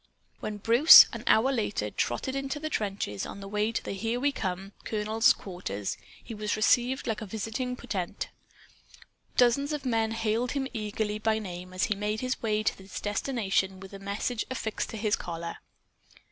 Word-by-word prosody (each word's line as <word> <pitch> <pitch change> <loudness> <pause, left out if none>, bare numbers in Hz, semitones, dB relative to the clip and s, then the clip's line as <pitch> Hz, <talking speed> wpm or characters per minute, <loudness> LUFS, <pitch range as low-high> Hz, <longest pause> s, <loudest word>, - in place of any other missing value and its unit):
When 210 -1 -4
Bruce, 235 +9 +9
an - - -6
hour 245 +5 +5
later, 205 - -1
trotted 190 - -2
into 275 +1 -3
the 310 +1 -4
trenches, 195 - -2
on - - -7
the 195 - -8
way 210 +2 0
to - - -2
the - - -5
"Here 225 +5 -2
We 285 +2 +2
Come" 190 -4 -4
colonel's 215 +1 +3
quarters, 140 - -4 0.3
he 230 - -8
was 210 -1 -2
received 245 +4 +2
like 220 -3 -2
a 215 - -5
visiting 225 +5 -3
potentate. 200 -8 -4 1.1
Dozens 280 +4 +3
of 290 -2 -4
men 225 -3 +1
hailed 225 +2 0
him 275 -2 -1
eagerly 210 -1 -2
by 220 0 +1
name 180 -3 -7
as 185 0 -2
he 215 - +2
made 210 +2 -2
his 255 0 -2
way 215 -1 0
to - - +2
his 190 +1 -7
destination 205 -4 -1
with 195 0 -11
the 195 - -9
message 205 +4 -2
affixed 225 -4 -3
to 225 - -6
his 210 -1 +1
collar. 170 -1 -6
215 Hz, 180 wpm, -28 LUFS, 195-240 Hz, 1.1 s, Bruce